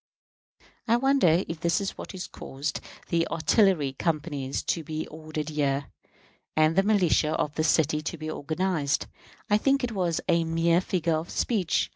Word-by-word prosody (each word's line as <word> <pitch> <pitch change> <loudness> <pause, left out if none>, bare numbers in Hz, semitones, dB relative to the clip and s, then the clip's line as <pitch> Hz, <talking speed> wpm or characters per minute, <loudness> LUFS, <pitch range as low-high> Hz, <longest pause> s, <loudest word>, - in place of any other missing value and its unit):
I 230 - +4
wonder 240 - +3
if 165 -1 -5
this 170 0 +1
is 200 -1 -3
what - - -8 0.2
caused 140 +4 -4 0.3
the 165 0 +1
artillery 165 - +2
companies 145 -3 -2
to 165 - -1
be 155 0 -4
ordered 155 -1 -6
here, 140 -2 -1 0.6
and 155 +1 +3
the 195 - +5
militia 185 -6 +2
of 150 -2 -1
this 155 +1 0
city 155 -1 +2
to 165 +2 -4
be 155 0 -6
organized? 155 -1 -1 0.4
I 210 0 +3
think 275 +3 +2
it 245 - -1
was 180 -6 0
a 170 -2 +3
mere 165 +1 +2
figure 175 -3 0
of 160 +3 -5
speech. 200 -8 0
165 Hz, 160 wpm, -27 LUFS, 155-185 Hz, 0.6 s, the